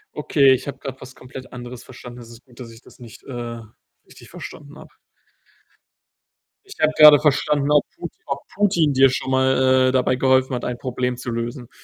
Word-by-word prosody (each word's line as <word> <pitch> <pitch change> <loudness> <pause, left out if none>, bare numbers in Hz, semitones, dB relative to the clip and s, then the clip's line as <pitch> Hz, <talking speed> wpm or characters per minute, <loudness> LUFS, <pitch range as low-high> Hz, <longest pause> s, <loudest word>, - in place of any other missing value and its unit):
Okay, 140 -3 +3
ich 130 - -3
habe 140 -1 -7
grad 135 -2 -8
was 130 +1 -12
komplett 130 0 -12
anderes 125 0 -9
verstanden. 125 -1 -12
Es 115 -1 -13
ist 115 +1 -15
gut, 125 -2 -21
dass 120 -2 -9
ich 115 0 -16
das - - -20
nicht, 120 -3 -14
äh, 120 -2 -7 0.5
richtig - - -17
verstanden 145 0 -11
habe. - - -14 1.8
Ich 395 - -13
habe 155 - +3
gerade 150 -1 +9
verstanden, 150 0 +1
ob 150 -1 +4
Putin 170 - -8
ob 140 - -4
Putin 175 -8 +1
dir 135 0 +5
schon 130 0 -4
mal, 130 0 +3
äh, - - 0
dabei 130 0 +1
geholfen 130 0 +2
hat, 125 - -4
ein 120 - -4
Problem 125 -1 -3
zu 125 -1 -6
lösen. 120 +2 -5
130 Hz, 195 wpm, -21 LUFS, 125-140 Hz, 1.8 s, gerade